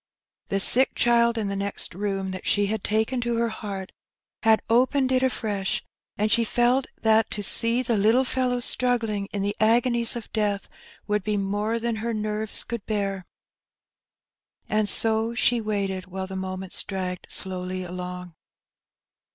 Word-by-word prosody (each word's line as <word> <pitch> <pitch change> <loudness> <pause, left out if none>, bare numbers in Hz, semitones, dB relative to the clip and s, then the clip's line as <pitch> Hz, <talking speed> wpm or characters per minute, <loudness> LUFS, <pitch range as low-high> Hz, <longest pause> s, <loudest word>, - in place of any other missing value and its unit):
The 195 - 0
sick 255 +7 +6
child 235 -1 +3
in 215 -2 -1
the 200 - -3
next 200 -1 -2
room, 195 0 -3
that 185 0 -6
she 205 0 +3
had 215 0 -3
taken 220 +4 0
to 240 0 -1
her 230 0 +1
heart, 200 -3 -6 0.5
had 220 -1 +4
opened 260 +3 +2
it 255 -1 +3
afresh, 210 -7 -1 0.3
and 215 +1 0
she 235 - +4
felt 245 +3 +1 0.2
that 220 0 +4
to 205 - -4
see 230 +5 +3
the 235 -2 0
little 220 +6 +4
fellow 250 -1 0
struggling 230 -5 0
in 200 -1 -2
the 205 +1 -1
agonies 235 +2 +3
of 235 -3 -8
death 205 -2 -1 0.4
would 210 -1 -1
be 210 0 -1
more 205 +3 -1
than 230 -1 -2
her 230 +1 -3
nerves 215 0 -2
could 235 -3 -5
bear. 195 -3 -2 1.4
And 215 -1 +1
so 225 +1 +2
she 240 -1 +2
waited 195 -3 -3
while 190 0 -5
the 190 0 -8
moments 190 0 -2
dragged 185 -2 -5
slowly 185 0 -3
along. 180 0 -7
215 Hz, 160 wpm, -25 LUFS, 195-235 Hz, 1.4 s, sick